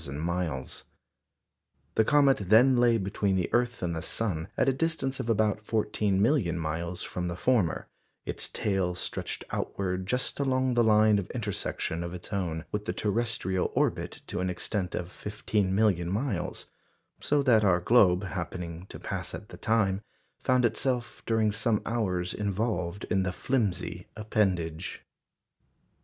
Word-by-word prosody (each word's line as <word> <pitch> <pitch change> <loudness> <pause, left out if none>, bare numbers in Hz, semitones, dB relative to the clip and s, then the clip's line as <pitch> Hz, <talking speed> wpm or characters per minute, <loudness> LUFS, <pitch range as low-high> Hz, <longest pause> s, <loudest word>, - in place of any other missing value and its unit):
The 75 -1 -3 1.2
comet 140 +1 +5
then 125 +5 +7
lay 120 -1 +4
between 100 -1 0
the 90 -2 -1
earth 120 -3 +1
and 85 -2 -1
the 80 - -3
sun 85 -1 -2
at - - +2
a 135 - +4
distance 135 -2 -1
of 115 - -3
about 105 -1 +2
fourteen 105 -3 0
million 100 - +2
miles 85 +2 -3
from 90 0 -3
the 85 - -3
former; 105 -5 +1 0.4
its - - -3
tail 95 -3 0
stretched - - -4
outward 95 -1 -2
just 125 +5 0
along 130 -2 +1
the 120 -1 +4
line 110 -1 +5
of 95 - -5
intersection 100 -7 -3
of 85 +1 -5
its 90 - -8
own 85 -4 -2
with 105 0 -3
the - - -1
terrestrial 105 -4 0
orbit - - 0
to - - -4
an 90 0 0
extent 90 +1 -2
of 90 0 -4
fifteen 105 -2 -1
million 95 -5 +2
miles; 105 -1 -2 0.5
so 145 -1 +2
that 115 -5 +5
our 95 -3 +4
globe, 90 -2 +4
happening 90 -1 -5
to - - -7
pass - - -4
at - - -10
the - - -10
time, 100 -4 +1 0.4
found 130 -1 +3
itself 120 0 -1
during 110 -2 +2
some 110 0 +1
hours 95 -6 0
involved 100 -3 -2
in 95 - +3
the 95 -1 0
flimsy 90 -7 -1
appendage. 95 -6 -1
100 Hz, 150 wpm, -28 LUFS, 90-115 Hz, 1.2 s, then